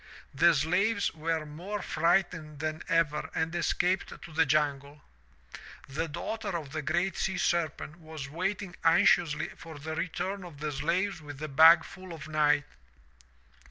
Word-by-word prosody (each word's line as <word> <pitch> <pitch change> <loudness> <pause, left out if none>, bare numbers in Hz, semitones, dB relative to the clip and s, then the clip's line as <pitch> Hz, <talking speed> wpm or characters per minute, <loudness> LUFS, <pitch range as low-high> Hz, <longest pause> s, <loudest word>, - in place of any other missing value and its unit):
The 165 +4 +5
slaves 190 +8 +1
were 160 0 -2
more 180 +7 -6
frightened 170 -2 0
than 155 +1 -3
ever 150 -3 +1
and 160 +1 -1
escaped 175 +1 +1 0.2
to - - -10
the 160 -1 +3
jungle. 145 0 0 0.8
"The 150 +5 -3
daughter 185 +4 -4
of 150 -5 -8
the 155 - -3
GREAT 175 +6 0
SEA 190 -1 -1
SERPENT 170 -2 -1
was 155 -4 -8
waiting 185 +4 -3
anxiously 170 -2 +4
for 160 -2 -11
the 155 +2 -5
return 185 +4 -3
of 165 -5 -11
the 150 0 -2
slaves 170 +6 -1
with 145 -2 -9
the 155 +2 -5
bag 160 +4 +7
full 185 -1 -10
of 155 -1 -9
night. 150 -2 +2
160 Hz, 150 wpm, -29 LUFS, 150-175 Hz, 0.8 s, bag